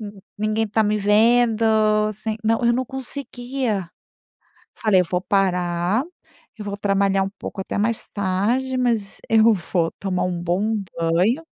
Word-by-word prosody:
hum, 205 -2 -8 0.2
ninguém 215 +1 0
tá 220 +1 +1
me 210 0 +1
vendo, 225 +2 +3 0.5
sem". 215 +1 -4
Não, 225 +2 +1
eu 235 - +4
não 255 +2 0
conseguia. 250 - -4 0.8
Falei: 210 -4 +3
"Eu - - +1
vou 180 - +1
parar, 180 +2 0 0.5
e - - -6
vou 200 -1 -4
trabalhar 195 -1 +1
um 195 - -4
pouco 195 - -6
até - - -4
mais 220 +2 0
tarde, 210 +7 0
mas 230 -5 0
eu 225 0 +5
vou 175 -3 -1
tomar 190 -2 -2
um 180 -1 -2
bom 190 +6 0 0.2
banho". 180 - +1
210 Hz, 150 wpm, -22 LUFS, 190-230 Hz, 0.8 s, eu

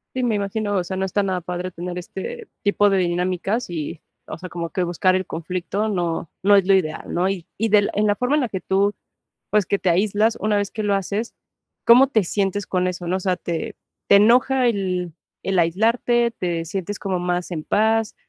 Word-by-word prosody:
Sí, 255 - -1
me 235 -3 +1
imagino. 205 +1 -2
O 185 - +1
sea, 190 +2 -5
no 190 - 0
está 205 +2 0
nada 190 -2 -1
padre, 180 +1 -4
tener 175 0 -6
este 430 - -7 0.2
tipo 205 0 +3
de 195 - +2
dinámicas 180 +5 -1
y 160 -1 -5 0.2
o 155 - -7
sea, 185 0 -8
como 170 -1 -4
que 185 - -1
buscar 175 +2 +2
el 185 0 -1
conflicto, 180 +5 -3
no 175 -5 -2
no 205 +1 +6
es 195 -2 +3
lo 195 - +5
ideal, 165 -5 -1
¿no? 180 +2 +1
Y 190 -4 -4
y 225 +1 +1
de 205 -1 +4
en 210 +1 +1
la 205 - +3
forma 250 +5 +1
en 300 - +2
la 250 - -1
que 190 - -3
tú, 195 +2 +1 0.6
pues, 210 -2 +2
que 200 +3 0
te 185 - +1
aíslas, 205 +5 +2
una 210 0 +1
vez 205 -1 -1
que 215 - -4
lo 205 -1 +1
haces, 200 +4 -2 0.5
¿cómo 250 +3 +7
te 225 -6 +2
sientes 195 +2 -1
con 185 -1 0
eso, 180 -1 -4
no? 180 - 0
O - - -5
sea, 185 -1 0
¿te 170 -2 -4 0.3
te 200 - +7
enoja 250 +4 +4
el 185 -5 -1 0.3
el 195 -1 -1
aislarte? 230 +7 +2
¿Te 170 -2 -2
sientes 195 +3 -4
como 190 -2 -2
más 180 0 -2
en 160 -3 -4
paz? 220 +3 +1
195 Hz, 220 wpm, -22 LUFS, 180-210 Hz, 0.6 s, cómo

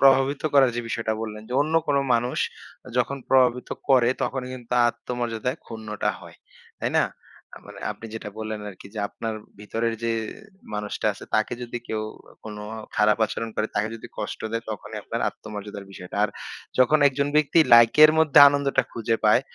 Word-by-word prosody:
প্রভাবিত 135 +1 +4
করার 135 -3 +6
যে 120 - 0
বিষয়টা 115 -1 -1
বললেন, 105 -1 -6
যে - - -7
অন্য 155 +2 -3
কোন 145 - +2 0.2
মানুষ 120 +2 0 0.6
যখন 125 +3 +1
প্রভাবিত 125 -1 +3 0.2
করে, 130 -3 +5
তখনই 130 -1 -2
কিন্তু 125 -1 -9 0.2
আত্মমর্যাদায় 120 +2 -3
ক্ষুণ্ণটা 110 -2 -3
হয়, - - -13 0.4
তাই - - -1
না? - - +4 0.5
আ - - -8
মানে, - - -11
আপনি 115 - -11
যেটা 110 - -5
বললেন 110 -1 -4
আরকি, 95 0 -11
যে 110 - -5
আপনার 115 -1 -5 0.2
ভেতরের 115 +2 -2
যে 115 - +1 0.6
মানুষটা 105 +1 -3
আছে, 95 - -11
তাকে 110 +1 +1
যদি 120 0 -5
কেউ 110 -1 -2 0.4
কোন 105 -1 -7 0.4
খারাপ 105 +1 +4
আচরণ 115 +1 -4
করে, 110 - +1
তাকে 105 +1 0
যদি 115 - -9
কষ্ট - - -4
দেয়, 115 0 -2
তখনই 105 +1 -6
আপনার 115 +3 -4
আত্মমর্যাদার 105 -1 -8
বিষয়টা। 90 -1 -9
আর - - 0 0.5
যখন 130 +5 +5
একজন 140 +1 -1
ব্যক্তি 150 +2 +3 0.2
লাইকের 120 +7 +8
মধ্যে 155 -1 +5
আনন্দটা 140 -1 +1
খুঁজে 115 0 0
পায়, 105 +3 +6
115 Hz, 170 wpm, -24 LUFS, 110-130 Hz, 0.6 s, লাইকের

